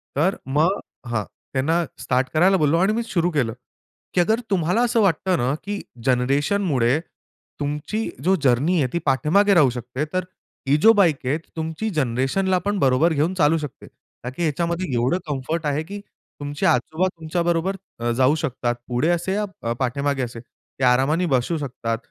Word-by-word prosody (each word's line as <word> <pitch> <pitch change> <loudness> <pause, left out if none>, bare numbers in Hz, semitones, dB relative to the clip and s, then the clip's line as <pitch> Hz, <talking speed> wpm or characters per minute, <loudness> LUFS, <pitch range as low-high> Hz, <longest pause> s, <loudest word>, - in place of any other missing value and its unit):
तर 165 +8 +2
मग 155 +8 +2 0.3
हां. 115 -3 -1 0.3
त्यांना 160 +6 +1 0.2
स्टार्ट 130 +1 0
करायला 185 +5 +4
बोललो 155 -1 +3
आणि 190 +5 +3
मी 235 +2 -1
सुरू 175 -6 0
केलं, 130 -8 0 0.6
की 180 - +4
अगर 220 +6 +2
तुम्हाला 185 +3 +1
असं 240 -1 +2
वाटतं 185 -1 +2
ना 125 +2 0
की 205 0 -4 0.2
जनरेशनमुळे 135 - +2 0.6
तुमची 150 +10 -2
जो 190 +3 +4
जर्नी 140 +8 +3
आहे 130 - +2
ती 170 - +1
पाठीमागे 155 - +3
राहू 155 -8 +5
शकते 125 +3 -4
तर, 185 0 0 0.4
ही 140 - +4
जो 220 +9 +7
बाईक 170 - +2
आहे 135 +4 +1 0.2
तुमची 160 +6 -3
जनरेशनला 135 +9 +1
पण 205 -1 0
बरोबर 140 +4 +3
घेऊन 155 +5 +1
चालू 165 -3 +3
शकते. 150 -4 -7
कारण 125 +1 -12
की - - -4
ह्याच्यामध्ये 170 +3 -1
एवढं 125 +8 +2
कम्फर्ट 150 +3 -3
आहे 145 +1 0
की 200 +5 -7
तुमचे 145 -7 -7
आजोबा 155 +9 +2
तुमच्याबरोबर 170 +3 0 0.2
अ, 120 0 0
जाऊ 130 +5 +3
शकतात. 125 -5 -2
पुढे 125 +6 0
असे 175 +2 0
या 195 - -3
पाठीमागे 140 +2 0
असे 120 -1 -6
ते 125 +2 -12
आरामाने 135 +8 +3
बसू 130 +6 +1
शकतात. 125 -5 -3
155 Hz, 165 wpm, -22 LUFS, 130-180 Hz, 0.6 s, जो